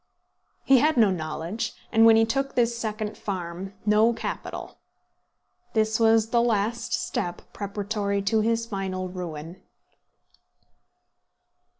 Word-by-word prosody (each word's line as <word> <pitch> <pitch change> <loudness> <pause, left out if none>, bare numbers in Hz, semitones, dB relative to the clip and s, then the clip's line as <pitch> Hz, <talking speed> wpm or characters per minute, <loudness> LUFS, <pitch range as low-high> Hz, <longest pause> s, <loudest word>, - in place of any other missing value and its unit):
He 265 -1 +6
had 305 +1 +2
no 215 -4 +5
knowledge, 165 +4 -3 0.2
and, 225 0 +6
when 225 - +8
he 225 0 +5
took 275 +4 -2
this 235 -1 +2
second 215 -2 -4
farm, 185 0 -5
no 215 +2 +4
capital. 230 - -6 0.9
This 220 0 +1
was 225 -1 +4
the 235 - +4
last 230 0 0
step 175 0 -2
preparatory 200 0 -2
to 220 +2 +2
his 230 +1 +1
final 190 -3 -4
ruin. 170 -2 -7
215 Hz, 115 wpm, -25 LUFS, 190-230 Hz, 0.9 s, when